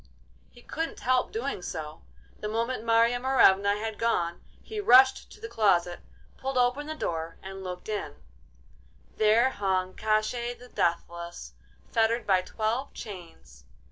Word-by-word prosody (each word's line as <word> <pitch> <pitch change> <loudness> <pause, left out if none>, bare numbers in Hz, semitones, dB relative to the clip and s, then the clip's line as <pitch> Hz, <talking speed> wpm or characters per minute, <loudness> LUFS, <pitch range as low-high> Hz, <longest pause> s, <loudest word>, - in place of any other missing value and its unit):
He 240 - -18
couldn't 325 +1 -4
help 255 0 +1
doing 235 -2 -3
so. 155 -3 -6 0.4
The 210 - -4
moment 230 +2 -2
Marya 230 +1 +3
Morevna 205 -6 +4
had 220 0 -5
gone 175 -7 0 0.2
he 435 -1 -6
rushed 265 -8 +5
to - - -14
the 450 - -6
closet, 180 - +2 0.4
pulled 270 0 -3
open 250 +4 +1
the 310 - -4
door, 165 - -4
and 195 0 -8
looked 180 -1 -7
in—there 65 - -2
hung 185 -3 -1
Koshchei 220 +3 -1
the 250 0 -14
Deathless, 170 - -3 0.4
fettered 230 +1 +1
by 190 -3 +3
twelve 225 +8 -3
chains. 165 - -11
215 Hz, 135 wpm, -28 LUFS, 175-245 Hz, 0.4 s, rushed